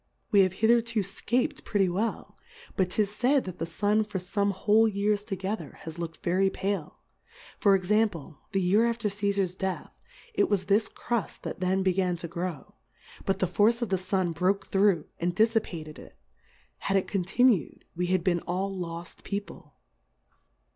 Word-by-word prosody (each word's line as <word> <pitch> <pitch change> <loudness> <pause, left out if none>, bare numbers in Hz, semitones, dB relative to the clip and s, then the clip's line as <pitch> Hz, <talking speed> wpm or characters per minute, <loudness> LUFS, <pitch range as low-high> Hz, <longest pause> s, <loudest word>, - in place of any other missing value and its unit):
We 205 - +5
have 185 -2 +4
hitherto 230 +2 +2
fcap'd 225 +6 -1
pretty 200 -3 +1
well; 200 +6 -2 0.4
but 185 -2 +1
'tis 205 +2 0
faid, 260 +3 +3
that 185 -2 -8
the 165 - -2
Sun 210 +6 +1
for 210 -2 -4
fome 200 +2 0
whole 210 +4 +4
Years 205 0 0
together 195 +2 -4
has 160 +1 -8
looked 165 -2 -6
very 190 +3 +2
pale; 190 -5 -3 0.6
for 200 -2 +5
Example, 185 -6 0
the 195 - +1
Year 205 +6 +3
af 235 - -2
ter 220 -3 -1
C^far\ 200 -2 0
Death; 190 0 -3 0.4
it 400 -2 +2
was 195 -2 +1
this 205 +3 +3
Cruft 235 -3 -3
that - - -5
then 190 +1 +1
began 185 -1 +1
to 170 0 -5
grow, 175 -2 -5 0.5
but 195 -1 +1
the 190 - +1
Force 210 +7 +2
of 230 - -3
the 190 -1 +1
Sun 185 -1 0
broke 185 +4 0
through, 195 -5 +2
and 175 +1 -1
diffipated 195 -8 0
it; - - -14 0.6
had 195 - +1
it 190 - 0
continued, 200 - +1
we 180 +1 -1
had 185 -1 +1
been 175 -2 +2
all 195 +2 -1
loft 170 -1 -7
People. 200 -6 -6
195 Hz, 170 wpm, -28 LUFS, 180-210 Hz, 0.6 s, We